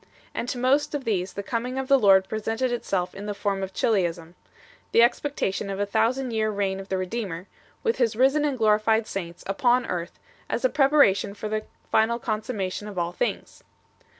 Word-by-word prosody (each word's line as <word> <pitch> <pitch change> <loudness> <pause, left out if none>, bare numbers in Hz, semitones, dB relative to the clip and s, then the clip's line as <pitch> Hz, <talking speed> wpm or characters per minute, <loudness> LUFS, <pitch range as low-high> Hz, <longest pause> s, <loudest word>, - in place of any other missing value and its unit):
And 245 - -3
to - - -3
most 270 +4 +2
of 285 - -3
these 190 -5 -1
the 200 - -5
coming 245 +4 -3
of 265 -1 -2
the 275 -1 +5
Lord 190 -3 +5
presented 225 +4 -1
itself 190 -6 -2
in 205 +2 -7
the 205 - -3
form 200 -1 -1
of 190 0 -4
Chiliasm, 175 -6 0 0.6
the 230 - +7
expectation 235 -6 0
of 195 0 -4
a 205 - +1
thousand 235 +5 0
years 215 -1 0
reign 195 -1 -1
of 195 - -9
the 190 - 0
Redeemer, 185 -2 -4 0.4
with 460 -1 +1
His 230 -4 +1
risen 270 +5 +3
and 285 -3 0
glorified 220 0 +3
saints, 175 -4 -6
upon 245 +5 +2
earth, 175 -1 -4 0.3
as - - -1
a - - +5
preparation 270 - +3
for 215 +1 -5
the 215 0 -2 0.3
final 225 +2 +3
consummation 215 -3 -3
of 205 -3 -8
all 170 0 -1
things - - -3 0.4
2 - - -31
215 Hz, 195 wpm, -25 LUFS, 195-245 Hz, 0.6 s, the